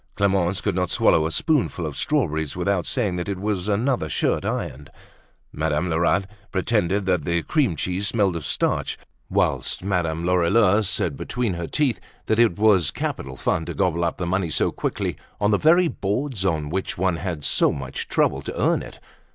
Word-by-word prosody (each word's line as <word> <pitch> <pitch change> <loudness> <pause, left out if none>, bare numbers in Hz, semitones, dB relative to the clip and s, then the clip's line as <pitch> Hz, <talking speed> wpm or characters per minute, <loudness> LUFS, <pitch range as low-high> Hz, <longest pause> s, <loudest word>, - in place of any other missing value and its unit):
Clemence 95 -2 +1
could 105 - 0
not 90 0 0
swallow 80 - +3
a - - -5
spoonful 125 - +1
of 75 -3 -5
strawberries 80 - 0
without 90 -1 0
saying 105 -9 0
that 90 +2 -3
it 100 - -2
was 100 -2 -2
another 105 - 0
shirt - - 0
ironed; 70 +2 -4 0.6
Madame 80 +3 -1
Lerat 85 +3 +2 0.3
pretended 100 -1 +1
that 90 -5 +1
the 85 +1 0
cream 135 - +1
cheese 90 +6 -1
smelt 100 -6 +1
of 85 - -4
starch; - - 0 0.3
whilst - - 0
Madame 85 -4 -1
Lorilleux 95 +4 +4
said 95 -6 -1
between 125 - -2
her 85 -1 -4
teeth 135 -9 0 0.3
that 110 - +1
it 115 -8 +4
was 100 -8 +4
capital 65 0 -4
fun 80 - 0
to 85 -1 -5
gobble 85 -2 +1
up 85 - -1
the 90 - -3
money 90 0 0
so - - +1
quickly - - -3 0.2
on 105 +1 +2
the 105 - +3
very 170 +3 +5
boards 110 - -2
on 80 -6 0
which 95 +2 -3
one 90 -1 +1
had - - -8
had 80 -5 -4
so - - +3
much 70 -2 -5
trouble - - +1
to - - -6
earn - - +2
it. - - -11
90 Hz, 185 wpm, -23 LUFS, 85-105 Hz, 0.6 s, very